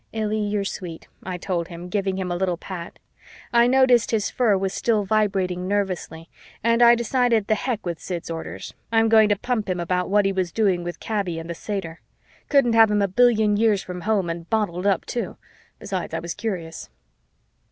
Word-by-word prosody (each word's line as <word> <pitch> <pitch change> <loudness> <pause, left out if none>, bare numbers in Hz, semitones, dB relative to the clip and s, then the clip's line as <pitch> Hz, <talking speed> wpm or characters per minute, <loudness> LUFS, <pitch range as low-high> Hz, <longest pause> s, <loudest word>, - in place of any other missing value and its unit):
"Illy, 215 -1 -1
you're 205 -1 -1
sweet," 175 -4 -6
I 185 -1 -5
told 175 -2 -2
him, 175 0 -8
giving 195 0 -1
him 185 -2 -3
a - - -1
little 180 -1 -1
pat. 175 -1 -8 0.6
I 235 0 +5
noticed 255 -2 +4
his 220 -3 0
fur 225 -6 +2
was 190 0 -2
still 215 -3 +1
vibrating 190 -3 0
nervously 185 -5 -2 0.4
and 230 +1 +3
I 235 0 +8
decided 235 -2 +1
the 215 - +2
heck 230 -1 -2
with 170 -2 -3
Sid's 175 -3 -5
orders, 165 0 -6 0.2
I'm 225 0 +3
going 220 -1 +6
to 205 - +3
pump 220 -2 -2
him 180 -1 -1
about 180 +1 -1
what 205 0 +3
he 195 - +1
was 185 -3 -1
doing 190 -5 +1
with 175 0 -6
Kaby 200 -6 -2
and 165 0 -6
the 170 - -4
satyr. 170 -3 -5 0.5
Couldn't 275 -5 +4
have 225 -1 +6
him 205 -1 +2
a - - +2
billion 215 0 +3
years 215 -3 +2
from 180 -1 -7
home 205 -2 0
and 165 0 -5
bottled 205 -4 0
up, 195 -3 +1
too. 240 - -4 0.4
Besides, 185 -3 -4
I - - -1
was 170 0 -5
curious. 180 -7 -5
200 Hz, 195 wpm, -23 LUFS, 180-220 Hz, 0.6 s, I